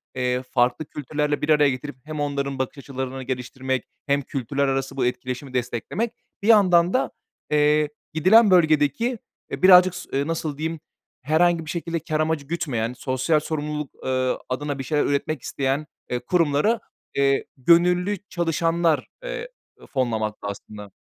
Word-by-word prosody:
eee, 125 0 0
farklı 125 +4 +1
kültürlerle 150 +1 -2
bir 150 - -2
araya 150 -2 +5
getirip 130 +1 -5
hem 155 0 -6
onların 140 -2 -2
bakış 130 +2 -3
açılarını 130 -1 -5
geliştirmek 130 0 -3 0.2
hem 140 0 +2
kültürler 135 +2 -2
arası 135 0 -2
bu 125 - +1
etkileşimi 130 +2 -3
desteklemek, 125 - -2 0.3
bir - - -1
yandan 185 -5 +5
da, 255 - +1 0.4
eee, 150 0 +3 0.2
gidilen 195 +6 +6
bölgedeki, 160 - +3 0.3
eee, - - -5
birazcık 185 -1 +7
s - - -8
eee, 140 +2 0
nasıl 160 -3 -3
diyeyim, 160 +1 -3 0.4
herhangi 160 +3 +2
bir - - -8
şekilde 170 -1 -3
kâr 155 0 -2
amacı 155 -2 0
gütmeyen, 125 -8 -2
sosyal 130 +4 0
sorumluluk, 150 -1 -3 0.2
eee, 130 -1 0
adına 140 +2 -3
bir - - -3
şeyler 150 +2 +1
üretmek 140 -1 -1
isteyen, 140 +4 -2 0.2
eee, 125 - -1
kurumları, 175 - +2 0.4
eee, 140 0 +2
gönüllü 180 +7 +3
çalışanlar, 165 -2 +1 0.2
eee, - - -5 0.4
fonlamakta 110 -6 -2
aslında. 100 0 -8
145 Hz, 145 wpm, -23 LUFS, 130-165 Hz, 0.4 s, birazcık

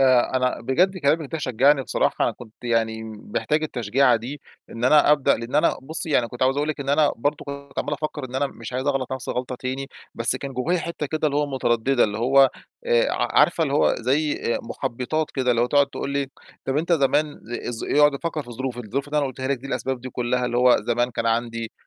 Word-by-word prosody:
آآ، 130 -1 +4
أنا 125 0 0
بجد 180 +11 +1
كلامِك 150 -1 +1
ده 160 - -2
شجّعني 135 +1 +3
بصراحة - - 0
كنت 115 -3 -12
يعني 115 -1 0
م 110 - -11
محتاج 155 +1 +1
التشجيعة 125 -2 +2
دي، 130 +6 -7 0.3
إن 115 +1 -4
أنا 150 +2 +6
أبدأ 145 -3 +3
لإن 115 +3 -7
أنا 155 +3 +3
بُصّي 160 +3 -5
يعني 125 -5 +2
كنت 125 +1 -5
عاوز 130 +1 +3
أقول 145 +1 0
لِك 155 - -3
إن 135 - -5
أنا 145 +1 +3
برضه 145 +5 -1
كنت 140 -1 -8
عَمّال 145 - -2
أفكّر 150 -1 -4
إن 130 0 -9
أنا 140 +2 +1
مش 135 - -9
عايز 130 +2 -2
أغلَط 135 -3 0
نَفْسي 130 -1 -4
الغلطة 125 +1 -3
تاني، 130 +2 -4 0.3
بس 115 +2 -1
كان 135 +1 -6
جوّايا 150 +8 0
حتة 165 -2 -4
كده 155 +2 -1
اللي 145 -1 0
هو 150 - +1
مُتردِّدة 130 -1 +1
اللي 105 0 -3
هو 135 +3 +5 0.4
آآ، 485 +1 +3
ع - - +1
عارفة 165 - +3
اللي 140 -3 0
هو 150 - +3
زي 145 +6 +1 0.2
آآ، - - -1
مُحبِّطات 130 +7 -3
كده 130 -2 0
اللي 120 -1 +2
هو - - +2
تقعُد 140 +2 +4
تقول 140 - -5
لي 140 0 -1 0.4
طَب 135 - -1
أنت 165 +3 0
ل - - +7
آآ، - - 0
ز - - -9
زمان 145 +2 +1 0.6
ي - - +6
أقعُد 145 -1 +6
أفكّر 155 +2 -3
في 120 - -17
الظروف، 125 +1 -4
الظروف 125 +5 -4
اللي 150 +1 0
أنا 145 - +1
قُلتها 130 0 -5
لِك 140 -2 0
دي 130 - -9
الأسباب 135 -2 -3
دي 130 +1 -7
كلّها 125 +1 -1
اللي 120 - -2
هو 125 0 +6
زمان 120 +1 0
كان 115 -1 -3
عندي 115 0 -1
135 Hz, 240 wpm, -23 LUFS, 125-145 Hz, 0.6 s, ل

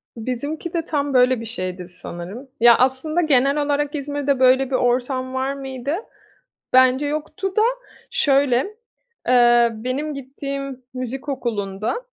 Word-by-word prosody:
Bizimki 285 +9 -4
de 335 - 0
tam 285 -2 -1
böyle 250 -1 +4
bir - - -6
şeydi 185 -5 -5
sanırım. 180 +8 -9
Ya 235 0 +7
aslında 265 +6 +1
genel 280 -1 +3
olarak 290 +1 0
İzmir'de 285 -1 -1
böyle 260 +1 +4
bir 270 - 0
ortam 255 +1 0
var 265 +1 -1
mıydı? 270 +1 -4 0.8
Bence 260 +2 +5
yoktu 310 +6 -3
da. 430 - +4 0.5
Şöyle, 275 -3 +3 0.7
eee, 240 -1 +5
benim 255 +7 -3
gittiğim 275 -1 -6
müzik 260 +3 -5
okulunda, 220 - -2
260 Hz, 130 wpm, -21 LUFS, 245-285 Hz, 0.8 s, Ya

